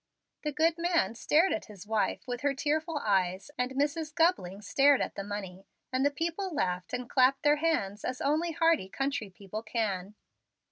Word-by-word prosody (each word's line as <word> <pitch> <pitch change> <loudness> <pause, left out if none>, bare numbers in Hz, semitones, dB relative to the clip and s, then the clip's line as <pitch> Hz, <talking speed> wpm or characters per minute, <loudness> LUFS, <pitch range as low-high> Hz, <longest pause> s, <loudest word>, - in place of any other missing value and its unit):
The 300 - -2
good 320 +3 +2
man 335 - +2
stared 315 +10 +3
at 325 - -3
his 205 -2 -12
wife 220 0 0
with 245 -1 -4
her 285 -1 +1
tearful 310 +3 -1
eyes, 190 +3 +1
and 250 +1 -2
Mrs. 300 +3 -1
Gubling 210 - +1
stared 280 +4 +4
at - - -2
the 200 - -5
money, 195 -2 -6 0.3
and 260 +1 +2
the 285 - +4
people 335 +6 -3
laughed 180 - -2
and 250 -1 -3
clapped 265 +3 +3
their 295 0 +5
hands 260 -11 0
as 255 0 -3
only 315 +4 +1
hearty 330 - +2
country 270 -3 -2
people 200 +3 -7
can. 210 -4 -2
265 Hz, 180 wpm, -30 LUFS, 205-315 Hz, 0.3 s, their